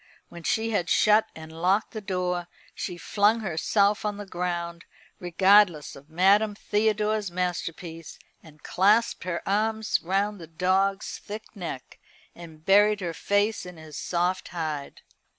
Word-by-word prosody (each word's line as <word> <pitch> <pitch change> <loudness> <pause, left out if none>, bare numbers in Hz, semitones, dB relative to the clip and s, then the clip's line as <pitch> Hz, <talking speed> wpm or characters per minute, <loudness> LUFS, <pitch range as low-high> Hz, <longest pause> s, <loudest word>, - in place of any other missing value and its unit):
When 170 - -10
she 225 +5 0
had 195 -5 -1
shut 215 0 +4
and 160 0 -10
locked 180 +6 0
the 215 - -6
door, 180 -3 -2 0.3
she 180 - -5
flung 210 +5 +2
herself 200 +3 +1
on 210 -1 -2
the 205 - -7
ground, 175 -2 -4 0.4
regardless 180 -2 +3
of 140 +2 -15
Madame 200 +5 +3
Theodore's 210 0 0
masterpiece, 175 -2 -4 0.2
and 155 -2 -18
clasped 210 +4 +2
her 170 -2 -4
arms 220 +2 0
round 200 +3 -1
the 165 - -10
dog's 190 +4 0
thick 215 +2 -9
neck, 165 -9 -7 0.3
and 160 -2 -13
buried 205 +1 +4
her 170 -2 -3
face 205 +4 0
in 180 -2 -10
his 155 -2 -11
soft 180 +1 -1
hide. 155 -5 -5
185 Hz, 140 wpm, -26 LUFS, 170-210 Hz, 0.4 s, shut